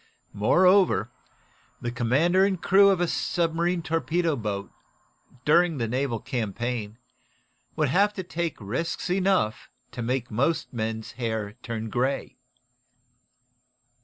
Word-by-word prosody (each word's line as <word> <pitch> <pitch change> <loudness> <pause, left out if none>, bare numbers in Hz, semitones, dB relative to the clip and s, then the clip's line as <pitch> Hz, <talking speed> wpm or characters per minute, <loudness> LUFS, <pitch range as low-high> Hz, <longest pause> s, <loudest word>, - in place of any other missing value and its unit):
Moreover, 180 - +4 0.7
the 120 - -3
commander 140 +11 +2
and 195 -2 +1
crew 200 +3 +5
of 190 -3 +2
a 175 - +1
submarine 170 +1 0
torpedo 165 0 0
boat, 100 -5 -4 0.7
during 165 -1 +3
a 115 - 0
naval 125 0 -1
campaign, 115 -1 -3 0.8
would 150 -3 +1
have 200 +8 +3
to 190 - -4
take 170 -3 -3
risks 150 - -3
enough 185 - +1 0.2
to 120 - -6
make 120 +1 -2
most 140 +9 0
men's 110 -1 -3
hair 110 -3 -2
turn 115 -2 -5
gray." 130 +3 -1
135 Hz, 115 wpm, -26 LUFS, 115-175 Hz, 0.8 s, crew